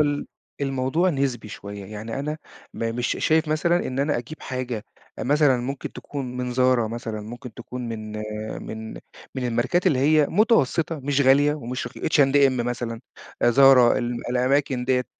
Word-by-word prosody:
ال 145 -1 +1 0.3
الموضوع 135 +6 +1
نسبي 135 -7 -2
شوية، 100 0 -8
يعني 110 +4 -6
أنا 150 +2 -3 0.3
ما 115 0 -2
مش 120 +1 -1
شايف 160 0 +2
مثلًا 170 +3 +1
إن 130 - -4
أنا 140 -1 +1
أجيب 130 +7 -9
حاجة، 125 -4 -4 0.4
مثلًا 145 -1 +3
ممكن 135 +3 -5
تكون 130 -4 -6
من 125 -1 -3
Zara 130 0 +4
مثلًا، 115 -2 -5
ممكن 120 +2 -9
تكون 125 +1 -7
من 110 -1 -6 0.5
من 110 0 -6 0.4
من 130 - -3
الماركات 125 +11 0
اللي 150 -8 +3
هي 150 +2 +4
مُتوسِّطة، 165 - +2
مش 140 +1 0
غالية 140 +2 +5
ومش 125 -3 -5
رخي - - -9
H&M 140 -2 +4
مثلًا، 120 -1 -3 0.4
آآ - - +5
Zara - - -5 0.4
ال 120 0 -2
الأماكن 125 0 +1
ديّة. 125 -1 +1
130 Hz, 160 wpm, -24 LUFS, 120-145 Hz, 0.5 s, غالية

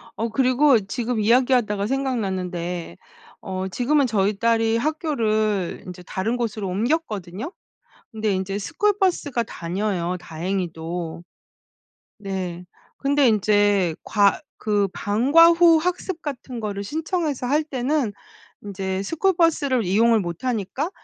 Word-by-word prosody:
어 225 - -1
그리고 255 +2 +4
지금 230 +2 -2
이야기하다가 230 -3 +2
생각났는데 185 - -3 0.4
어 190 0 -4
지금은 275 +8 +2
저희 210 -3 +1
딸이 225 0 +2
학교를 220 - -1
인제 180 -1 -9
다른 205 +7 -2
곳으로 220 -4 -3
옮겼거든요. 215 - -2 0.6
근데 215 -2 -1
인제 190 +1 -2
스쿨 400 - 0
버스가 290 -10 +1
다녀요 180 -2 -2
다행히도. 170 -1 -4 1.0
네. 185 -3 -5 0.3
근데 280 -1 +3
인제 205 -4 +3
과 200 -2 +3 0.2
그 205 -2 +1
방과 270 +11 +5
후 335 -1 +6
학습 360 +1 -2
같은 260 -5 -6
거를 205 -2 -4
신청해서 315 - -2
할 295 +4 +2
때는 265 -3 -1 0.5
인제 190 -1 -3
스쿨 330 - +1
버스를 285 - +2
이용을 225 +4 +4
못 175 +3 -6
하니까 250 - -2
220 Hz, 265 characters per minute, -23 LUFS, 190-275 Hz, 1.0 s, 후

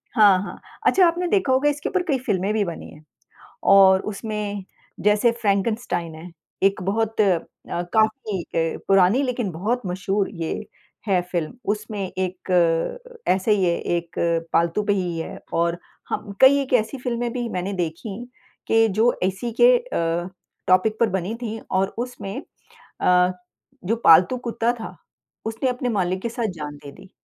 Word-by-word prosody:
हाँ, 205 -5 +6
हाँ। - - -8 0.3
अच्छा 375 - +5
आपने 350 +1 0
देखा 360 -8 +2
होगा 275 +3 +3
इसके 290 0 -3
ऊपर 370 -1 0
कई 270 - +2
फ़िल्में 195 +2 0
भी 215 -1 +1
बनी 170 -2 -7
हैं 150 - -15 0.7
और 190 -1 +7
उसमें 205 -2 -4 0.4
जैसे 210 +3 +3
फ्रैंकनस्टाइन 200 -5 0
है, 165 +3 -10 0.3
एक 195 -1 +2
बहुत 220 +4 -1
अ, 190 -5 +4 0.3
काफ़ी 215 +3 0
अ, 165 -1 -2
पुरानी, 195 +6 +4
लेकिन 245 -6 -1
बहुत 215 +10 -1
मशहूर 190 +2 -1
ये 165 +2 -4 0.4
है 190 -3 +3
फ़िल्म। 170 -4 -1 0.2
उसमें 215 0 -5 0.2
एक 185 0 -4 0.8
ऐसे 190 +3 +2
ही 200 -3 +2
है, 170 -1 +2
एक 170 -1 -3 0.4
पालतू 170 +5 +2
पे 205 - +2
ही 180 -4 -1
है 165 - -6
और 170 +1 +1 0.3
हम 205 - -4
कई 265 +2 +7
एक 265 - -8
ऐसी 225 +5 -6
फ़िल्में 240 -1 -2
भी 240 -1 -3
मैंने 185 -1 -3
देखी 180 +3 -4 0.5
कि 225 0 +5
जो 220 +4 +3
इसी 190 +6 -1
के - - +7
अ, 175 - -2 0.4
टॉपिक 185 +4 +3
पर 230 - +4
बनी 190 +3 -2
थीं, 225 -1 -4
और 190 +1 +2
उसमें 245 0 -5 0.6
अ, 180 0 +4 0.5
जो 220 +5 +1
पालतू 175 +9 +6
कुत्ता 235 -1 -1
था, 230 -2 -8 0.5
उसने 225 +4 -1
अपने 250 0 -2
मालिक 185 -4 -1
के 235 - -2
साथ 235 -1 -2
जान 150 -2 -6
दे 140 - -9
दी। 190 - -15
200 Hz, 160 wpm, -23 LUFS, 180-235 Hz, 0.8 s, और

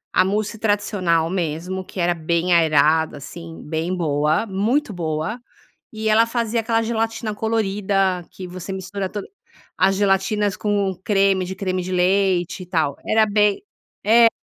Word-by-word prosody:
a 185 - +6
mousse 210 +3 -2
tradicional, 200 -6 +1
mesmo 175 +1 -3
que 185 - -9
era 175 0 +2
bem 170 +2 0
aerada, 160 -1 +3
assim, 165 +3 -9
bem 160 +3 -3
boa, 155 +1 +1
muito 220 +6 0
boa. 165 +6 -3 0.5
E 220 0 -2
ela 225 +2 +5
fazia 230 -1 -1
aquela 225 0 +1
gelatina 225 -1 -2
colorida, 195 -4 0
que 185 -1 -8
você 185 +1 -7
mistura 190 0 -4
toda 205 -1 -6 0.5
as 190 +1 +3
gelatinas 200 +1 +1
com 205 -2 0
o 185 - -8
creme 195 -1 +2
de 185 +1 -5
creme 185 -1 -2
de 185 +1 -5
leite 185 0 +1
e - - -9
tal. 160 -5 0
Era 220 0 +4
bem, 210 - +2 0.4
é 230 +2 +7
190 Hz, 155 wpm, -21 LUFS, 175-210 Hz, 0.5 s, é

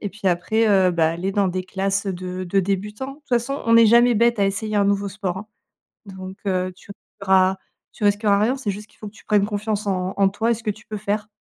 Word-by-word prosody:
et 205 - -3
puis 200 0 -7
après, 220 +6 +1
heu, 190 -2 +4
bah, 165 -2 +2
aller 175 +4 -3
dans 200 -1 +2
des 185 +1 -3
classes, 195 +1 -2
heu, 195 - -1
de 185 +1 -5
de 195 +2 +1
débutants. 210 +7 -3
De - - -15
toute 295 - -34
façon, 250 +3 -1
on 230 0 +5
est 230 -1 +7
jamais 235 +2 +5
bête 235 +1 +3
à 200 - +3
essayer 210 +2 -2
un 200 - +3
nouveau 200 0 0
sport, 195 -2 -4
hein. 200 +3 -7 0.6
Donc, 190 0 -9
heu, 185 -1 0
tu 185 - -20 0.3
auras 190 -1 +3 0.4
tu - - -8
risqueras 205 0 +3
rien, 230 +5 +2
c'est 260 -7 -3
juste 210 +2 -8
qu'il - - -27
faut 215 - -8
que 205 - -11
tu - - -18
prennes 205 -2 +3
confiance 210 0 -3
en 185 -1 -1
en 195 -1 +4
toi 225 +4 0
et - - +4
ce 230 - -8
que 215 - 0
tu 210 +1 -14
peux 215 - -5
faire. 210 +1 -2
200 Hz, 265 wpm, -22 LUFS, 190-215 Hz, 0.6 s, est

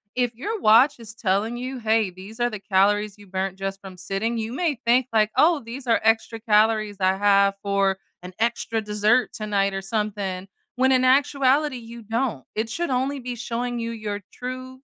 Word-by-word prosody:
If 245 -2 0
your 415 - -4
watch 235 +3 +5
is 225 -1 -9
telling 215 +1 0
you, 255 +2 -5
hey, 220 -3 +2
these 195 +5 -12
are 240 0 +2
the 215 -3 -6
calories 205 +1 +1
you 205 -1 -16
burnt 190 0 -3
just 195 0 -4
from 190 -1 -10
sitting, 200 +6 -2
you 220 +1 -3
may 295 -2 -1
think, 245 +2 +3
like, 215 -1 +3
"Oh, 320 -1 +4
these 245 +4 -8
are 230 - +3
extra 225 0 +1
calories 215 -1 +2
I 190 0 +3
have 200 0 +4
for 195 -1 +1 0.2
an 180 +1 -9
extra 230 -1 0
dessert 210 +4 +2
tonight 200 -2 -1
or 195 - -3
something." 195 -2 -3 0.3
When 260 +1 +3
in 255 0 +3
actuality, 275 +1 +3
you 235 0 -10
don't. 225 - -2
It 220 +1 -1
should 340 +8 -2
only 265 +2 -1
be 250 -1 -5
showing 240 +1 -3
you 230 0 -3
your 210 -3 -5
true 255 +1 -7
225 Hz, 190 wpm, -24 LUFS, 200-250 Hz, 0.3 s, watch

